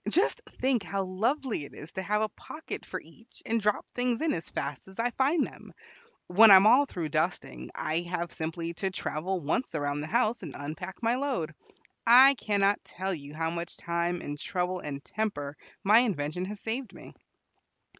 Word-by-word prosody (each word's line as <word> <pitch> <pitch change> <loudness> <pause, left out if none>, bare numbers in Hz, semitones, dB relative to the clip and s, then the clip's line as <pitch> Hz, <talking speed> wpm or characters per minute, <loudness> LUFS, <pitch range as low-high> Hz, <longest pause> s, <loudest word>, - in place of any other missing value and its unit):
Just 350 - +2 0.2
think 260 -3 +2
how 195 0 -2
lovely 220 - -1
it 140 - -11
is 150 - -10
to 190 - -4
have 210 +3 +1
a 215 - 0
pocket 310 +8 -8
for - - -4
each, 230 +1 -19
and 230 0 0
drop 210 0 0
things 245 -1 0
in 320 -1 +1
as 165 - -4
fast 140 +3 -4
as 190 - -14
I 240 +1 +1
find 280 +6 +2
them. - - -12 0.5
When 215 +5 +7
I 195 - +12
am 190 +2 +7
all 260 +6 +6
through 165 -9 -4
dusting, 155 +4 -2
I 155 +2 0
have 175 0 -3
simply 165 +1 -3
to 195 - +1
travel 185 0 -2
once 165 - -1
around 145 -1 -1
the 150 - -5
house 235 +3 +1
and 160 -7 -7
unpack 180 +9 -7
my 235 +2 +2
load. 255 - -2 0.5
I 260 +4 +9
cannot 205 -5 +1
tell 190 +1 -3
you 145 -2 -8
how 165 +1 -1
much 170 0 -4
time 170 +1 -1
and 145 0 -5
trouble 180 +1 -2
and 140 -3 -6
temper 150 -10 -3 0.3
my 210 +3 +7
invention 180 -7 -1
has 205 +2 -6
saved 230 +1 -4
me." - - -12
190 Hz, 190 wpm, -29 LUFS, 165-230 Hz, 0.5 s, I